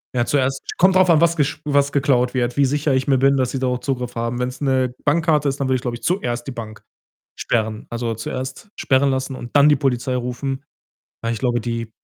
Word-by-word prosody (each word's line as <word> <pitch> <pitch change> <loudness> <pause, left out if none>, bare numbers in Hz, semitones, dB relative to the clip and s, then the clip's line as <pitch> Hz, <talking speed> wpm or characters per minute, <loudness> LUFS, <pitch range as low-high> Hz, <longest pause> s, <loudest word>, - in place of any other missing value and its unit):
ja, 120 -1 +2
zuerst 135 0 0 0.2
kommt 185 +2 +4
drauf 185 -1 +5
an, 165 -1 +5
was 170 0 +3
gest 145 -1 0
was 140 -1 +2
geklaut 130 -3 +2
wird, 120 -1 0
wie 140 - +4
sicher 145 +1 0
ich 130 +1 0
mir 135 -2 +4
bin, 135 +1 +4
dass 130 -2 0
sie 135 - -3
darauf 125 -1 -1
Zugriff 125 -3 -3
haben. 115 +1 -2
Wenn's 125 +2 -3
'ne 130 -2 +1
Bankkarte 150 -1 +2
ist, 135 +1 -4
dann 135 - 0
würde 130 - +2
ich, 125 - -2
glaube 120 -1 -3
ich, 115 - -23
zuerst 120 -10 -1
die - - -3
Bank 110 -3 -8 0.5
sperren. 110 -2 -2
Also, 115 -1 -2
zuerst 130 - -6
sperren 135 +1 +2
lassen 130 0 -2
und 120 - -9
dann 145 +1 +7
die 150 - +5
Polizei 130 -2 -1
rufen. 130 +3 -4 0.6
Aber 115 0 -1
ich 115 - -3
glaube, 120 -1 0
die 115 0 -4
130 Hz, 230 wpm, -21 LUFS, 120-140 Hz, 0.6 s, dann